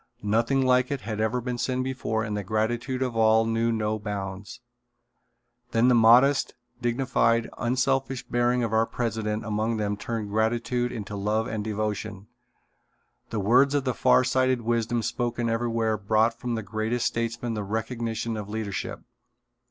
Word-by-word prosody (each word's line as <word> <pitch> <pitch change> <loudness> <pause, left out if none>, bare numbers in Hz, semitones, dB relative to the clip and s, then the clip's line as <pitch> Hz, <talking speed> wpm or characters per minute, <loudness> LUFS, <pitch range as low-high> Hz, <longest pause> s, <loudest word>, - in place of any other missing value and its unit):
Nothing 115 +6 +2
like 125 0 +3
it 140 -2 -3
had 110 -1 -4
ever 110 +3 0
been 125 0 -4
seen 130 0 -1
before 125 -4 -2
and 105 -2 -3
the 105 - -3
gratitude 120 +6 -1
of 125 -3 -3
all 110 0 +4
knew 115 +1 +1
no 110 -1 -1
bounds. 100 +2 -6 1.1
Then 115 +2 +4
the - - +5
modest, 120 +5 +5 0.3
dignified, 120 -1 +1
unselfish 130 +1 0
bearing 120 0 +1
of 115 -1 -2
our 110 0 +3
president 110 -2 -2
among 110 +1 -1
them 105 -1 -1
turned 110 -1 -4
gratitude 115 +3 0
into 105 -2 -6
love 105 +2 0
and 110 -1 -3
devotion. 105 -1 -3 1.0
The 110 - -2
words 125 +8 +4
of 145 - +1
far 130 - +4
sighted 130 0 +1
wisdom 115 0 0
spoken 120 +1 -1
everywhere 115 -2 0
brought 110 +3 +2
from 120 0 -4
the 110 - -3
greatest 110 +3 -2
statesmen 115 0 -2
the 105 - -3
recognition 115 +2 -3
of 105 -1 -6
leadership. 105 -2 -4
115 Hz, 150 wpm, -26 LUFS, 110-120 Hz, 1.1 s, the